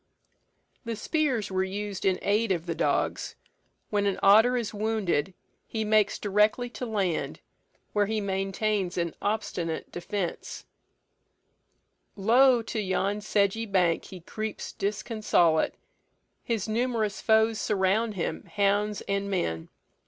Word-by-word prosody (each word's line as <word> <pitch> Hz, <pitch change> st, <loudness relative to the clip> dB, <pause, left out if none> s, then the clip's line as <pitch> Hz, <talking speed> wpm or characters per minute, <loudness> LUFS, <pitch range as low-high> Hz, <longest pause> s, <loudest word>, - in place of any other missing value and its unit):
The 230 Hz, -2 st, -3 dB
spears 250 Hz, -, -1 dB
were 190 Hz, 0 st, +1 dB
used 200 Hz, +1 st, -4 dB
in 190 Hz, -1 st, +3 dB
aid 210 Hz, +1 st, +2 dB
of 170 Hz, -3 st, -1 dB
the 170 Hz, -, -2 dB
dogs. -, -, -1 dB, 0.6 s
When 205 Hz, -1 st, +1 dB
an 195 Hz, -, -1 dB
otter 220 Hz, +5 st, +6 dB
is 230 Hz, -3 st, -3 dB
wounded, 205 Hz, -5 st, -1 dB, 0.3 s
he 220 Hz, -1 st, -2 dB
makes 215 Hz, -1 st, +3 dB
directly 210 Hz, +4 st, +1 dB
to 250 Hz, -, -5 dB
land, 195 Hz, -6 st, -1 dB, 0.5 s
where 205 Hz, -1 st, +2 dB
he 220 Hz, 0 st, -1 dB
maintains 195 Hz, -1 st, -1 dB
an 170 Hz, -2 st, -1 dB
obstinate 180 Hz, -6 st, -2 dB
defence: 175 Hz, +1 st, -4 dB, 1.5 s
"Lo! 240 Hz, +4 st, +4 dB
to 225 Hz, 0 st, -4 dB
yon 195 Hz, +1 st, 0 dB
sedgy 210 Hz, +2 st, +1 dB
bank 180 Hz, -4 st, +2 dB
He 185 Hz, -2 st, -10 dB
creeps 215 Hz, +4 st, -5 dB
disconsolate; 200 Hz, -6 st, +1 dB, 0.7 s
his 225 Hz, -4 st, -2 dB
numerous 220 Hz, -2 st, -1 dB
foes 220 Hz, 0 st, +3 dB
Surround 210 Hz, +2 st, +1 dB
him, 170 Hz, -, -3 dB
hounds 205 Hz, +1 st, +1 dB
and 200 Hz, 0 st, -2 dB
men. 80 Hz, -, -2 dB
205 Hz, 125 wpm, -27 LUFS, 190-220 Hz, 1.5 s, otter